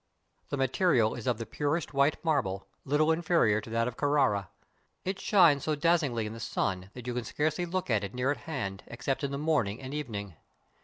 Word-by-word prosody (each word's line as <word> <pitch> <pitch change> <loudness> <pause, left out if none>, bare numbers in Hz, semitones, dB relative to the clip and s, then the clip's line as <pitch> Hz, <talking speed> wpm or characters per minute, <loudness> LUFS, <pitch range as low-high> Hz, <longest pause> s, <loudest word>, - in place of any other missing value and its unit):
The 145 - -2
material 130 -3 +3
is 120 - -6
of 125 - +2
the 115 - -5
purest 150 +4 -2
white 140 +2 +3
marble, 100 -12 0 0.2
little 150 +3 +3
inferior 160 -10 +3
to 110 - -10
that 115 +1 +1
of 125 - -5
Carrara. 135 -10 +2 0.6
It 190 +1 -2
shines 170 -9 +5
so 155 - +1
dazzingly 145 -8 +2
in 105 - -5
the 115 - -8
sun, 95 -4 -2
that 125 -2 -8
you 125 - -2
can 125 0 -2
scarcely 155 +8 -1
look 185 -4 -2
at 105 -2 +2
it 100 +4 -5
near 125 +2 +1
at 145 - -2
hand, 100 -10 -3
except 135 +4 -3
in 140 - 0
the 140 - -3
morning 140 -9 0
and 130 +1 -7
evening. 105 - -5
135 Hz, 205 wpm, -30 LUFS, 110-155 Hz, 0.6 s, shines